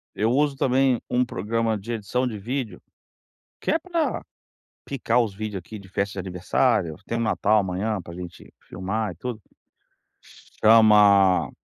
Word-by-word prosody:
Eu 110 +2 +1
uso 145 +2 +2
também 130 -2 +2
um 125 0 +2
programa 115 -1 -1
de 110 +4 -6
edição 120 +4 -1
de 110 -3 -5
vídeo, 120 +3 -4 0.8
que - - -2
é 320 - +2
para 335 -1 -2 0.6
picar 125 -3 0
os 110 -4 -2
vídeos 105 -1 -5
aqui 105 +5 -10
de 100 - -14
festa 100 +1 -2
de - - -6
aniversário, 95 0 0
tem 115 - -2
um - - -1
Natal 110 -1 +2
amanhã 100 +2 -2
pra 85 0 -11
gente 90 0 -10
filmar 100 +3 -3
e - - -20
tudo, 115 +4 -6 1.2
chama 105 -4 +6
110 Hz, 155 wpm, -24 LUFS, 100-125 Hz, 1.2 s, chama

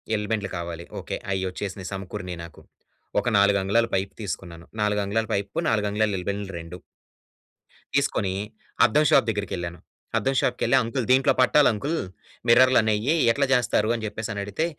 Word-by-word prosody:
ఎల్‌బెండ్లు 105 -1 -2
కావాలి 85 0 -6
ఓకే. - - -5 0.2
అయొచ్చేసినియి 95 0 -4
సమకూరినియి 90 -2 -6
నాకు. 85 - -12 0.6
ఒక 120 - -4
నాలుగంగుళాల 100 +3 +3
పైప్ 95 +1 -2
తీసుకున్నాను. 85 -3 -6 0.2
నాలుగంగుళాల 105 +1 0
పైప్‌కు 100 0 -2
నాలుగంగుళాల 105 0 +1
ఎల్‌బెండ్‌లు 100 +2 -4
2... 85 +2 -9 1.2
తీసుకొనీ 95 -1 +1 0.5
అద్దం 150 +1 +3
షాప్ 135 - +5
దగ్గరికెళ్ళాను. 90 -5 -4 0.4
అద్దం 135 +1 0
షాప్‌కెళ్లి 125 +2 +1
అంకుల్ 115 +2 -2
దీంట్లో 130 +1 +5
పట్టాలంకుల్ 140 +3 +3 0.5
మిర్రర్‌లనేయి 120 0 +4 0.2
ఎట్లా 140 +4 +1
జేస్తారు, 115 -4 +2
అని 115 -2 -4
జెప్పేసని 110 0 -4
అడిగితే, 105 +11 -2
105 Hz, 120 wpm, -25 LUFS, 95-115 Hz, 1.2 s, షాప్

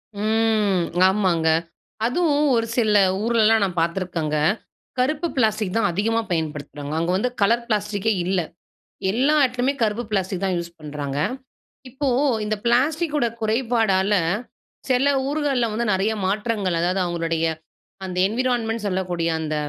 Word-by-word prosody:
ம் 215 -3 +1 0.2
ஆமாங்க. 185 -5 +1 0.6
அதுவும் 295 +3 +2
ஒரு 230 -1 +1
சில 215 -3 +3 0.3
ஊர்லலாம் 225 -1 +3
நான் 180 -3 -2
பாத்துருக்கேங்க, 170 -3 -1 0.6
கருப்பு 300 +6 +1
பிளாஸ்டிக் 215 -4 +1
தான் 225 - +2
அதிகமா 225 +5 0
பயன்படுத்துறாங்க. 150 -2 -4
அங்க 170 +2 0
வந்து 250 +6 0
கலர் 235 +4 +3
பிளாஸ்டிக்கே 210 -1 0
இல்ல. 185 +1 +1 0.7
எல்லா 260 +9 +2
இடத்துலயுமே 255 +2 0
கருப்பு 220 +2 0
பிளாஸ்டிக் 190 -2 -1
தான் 185 -2 0
யூஸ் 170 0 -5
பண்ணுறாங்க. 145 -2 -5 0.7
இப்போ 270 +3 -3 0.4
இந்த 215 0 -1
பிளாஸ்டிக்கோட 295 +4 +2 0.2
குறைபாடல்ல 220 -4 +1 0.7
சில 255 +2 +3 0.2
ஊர்கள்ல 285 -5 0
வந்து 235 +2 -1
நெறைய 195 +3 +1
மாற்றங்கள், 205 -2 -1
அதாவது 180 +2 0
அவங்களுடைய 165 -1 -1 0.6
அந்த 180 -1 -5
என்விரான்மென்ட் 230 -1 -1
சொல்லக்கூடிய 180 -3 -1
அந்த 155 -1 -3
210 Hz, 120 wpm, -22 LUFS, 180-235 Hz, 0.7 s, சில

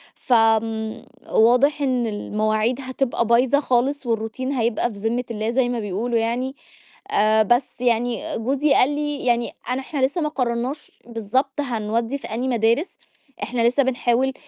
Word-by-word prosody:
ف 255 - -1
آمم، 225 -1 +1 0.2
واضح 255 +6 +4
إن 255 -4 +1
المواعيد 215 +3 -1
هتبقى 260 -2 -1
بايظة 250 +4 +4
خالص، 265 +1 0
والروتين 230 +3 -2
هيبقى 240 -2 0
في 200 - -10
ذمة 230 +3 -1
الله 215 0 -2
زي 245 0 +1
ما 245 -1 -2
بيقولوا 220 +4 -2
يعني، 245 +4 -1 0.6
آآ، 215 +1 +4
بس 240 +5 +3 0.2
يعني 240 -1 0
جوزي 275 +5 +1
قال 255 - +4
لي 295 -2 -3
يعني 240 -1 +1 0.2
أن 250 +1 0
إحنا 270 0 -1
لسه 305 +6 -2
ما 300 - 0
قررّناش 255 +1 -3 0.2
بالضبط 245 +5 -1
هنودّي 230 +1 -2
في - - -9
أني 235 +4 -3
مدارس، 235 - +1 0.5
إحنا 240 -1 -2
لسه 265 +3 +3
بنحاول 255 +1 +1
240 Hz, 155 wpm, -22 LUFS, 225-265 Hz, 0.6 s, واضح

